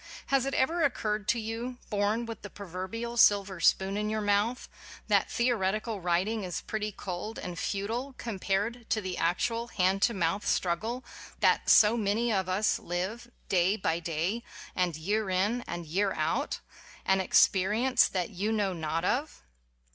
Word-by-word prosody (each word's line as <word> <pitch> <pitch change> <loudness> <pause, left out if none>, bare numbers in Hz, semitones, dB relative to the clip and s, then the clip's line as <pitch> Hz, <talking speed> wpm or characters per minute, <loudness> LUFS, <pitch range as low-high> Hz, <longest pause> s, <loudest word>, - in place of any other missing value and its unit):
Has 270 -1 +3
it 275 - -2
ever 330 +6 +1
occurred 215 -7 0
to 235 - +2
you, 230 +3 -4
born 210 +3 +1
with 230 -2 -7
the 205 - -8
proverbial 200 +6 -6
silver 200 -4 +4
spoon 190 +4 +3
in 210 0 -1
your 215 0 -1
mouth, 205 +4 +1 0.4
that - - +3
theoretical 215 -3 0
writing 185 +5 0
is 180 -2 -4
pretty 215 -1 -3
cold 190 +3 -6
and 175 -2 -6
futile 230 +7 -2
com 230 -6 -6
pared 215 +5 -1
to 220 - +2
the 185 -3 -4
actual 230 +8 0
hand 190 -2 +1
to 235 +1 +3
mouth 185 +2 0
struggle 220 +9 -1 0.4
that - - +3
so 215 +1 +7
many 220 +2 +1
of 190 -2 0
us 200 +4 +1
live, 190 +7 -4 0.2
day 185 +1 +3
by 165 -4 0
day 170 +7 -2 0.3
and 180 -3 +1
year 200 +6 -1
in 200 +6 +1
and 175 -1 -5
year 195 +5 0
out - - -1
ŌĆö - - -21
an 190 0 +3
ex 185 - +6
perience 220 +7 +2
that 185 +1 -2
you 205 +3 -2
know 205 -3 0
not 160 -1 -2
of? 285 +5 -1
205 Hz, 170 wpm, -29 LUFS, 185-230 Hz, 0.4 s, so